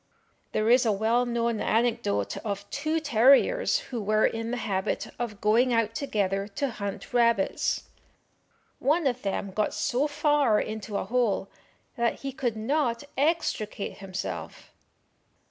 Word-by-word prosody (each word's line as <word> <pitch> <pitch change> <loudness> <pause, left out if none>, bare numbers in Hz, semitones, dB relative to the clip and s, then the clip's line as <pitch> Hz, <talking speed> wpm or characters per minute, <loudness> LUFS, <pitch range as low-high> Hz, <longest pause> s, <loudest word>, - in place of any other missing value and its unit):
There 215 - 0
is 245 +2 +6
a 225 - +2
well 225 +4 +1
known 235 -2 0
anecdote 220 - 0
of 200 -1 -4
two 310 +3 -1
terriers 290 - +4 0.2
who 235 - -2
were 215 +1 +2
in 225 0 -1
the 245 - -2
habit 190 -2 -2
of 220 -4 -4
going 235 +4 +3
out 225 -1 +1
together 200 -7 -1
to 275 +6 -2
hunt 200 +2 -6
rabbits. 235 -4 +2 1.0
One 305 +5 +2
of 255 -2 0
them 195 0 -2
got 210 +2 -1
so 265 +5 +1
far 290 -6 +2
into 215 -1 -4
a - - -2
hole 230 -5 0 0.5
that 235 -1 0
he 275 - -3
could 245 -4 -2
not 235 +1 0
extricate 280 -9 -1
himself. 195 -1 -6
230 Hz, 140 wpm, -27 LUFS, 210-260 Hz, 1.0 s, is